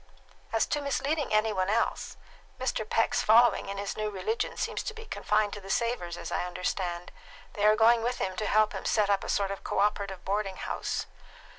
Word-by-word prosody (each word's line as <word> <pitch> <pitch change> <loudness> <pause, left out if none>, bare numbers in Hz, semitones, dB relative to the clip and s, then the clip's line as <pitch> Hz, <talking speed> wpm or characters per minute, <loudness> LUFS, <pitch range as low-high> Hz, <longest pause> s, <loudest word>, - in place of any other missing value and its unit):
"As 225 - +2
to 295 - -1
misleading 285 +1 -1
any 215 0 +2
one 185 -1 0
else, 225 +3 -1 0.4
Mr. 245 -4 -2
Peck's 225 - +2
following 230 -2 +5
in 200 - -4
his 200 0 -3
new 215 0 -2
religion 325 - -2
seems - - -2
to 445 - -5
be 450 0 -9
confined 210 - 0
to 205 - -7
the 195 - -11
Savors, 195 -6 -1
as - - -7
I - - 0
understand. 180 -1 -3 0.4
They 210 0 +2
are 215 - +6
going 230 +1 +5
with 245 +2 -1
him 185 -1 -2
to 215 - -1
help 215 0 +3
him - - -5
set 210 -2 +2
up 195 - +1
a - - -6
sort 200 -1 +1
of 195 - -6
cooperative 200 -2 -1
boarding 195 0 -1
house. - - -3
210 Hz, 200 wpm, -29 LUFS, 195-230 Hz, 0.4 s, are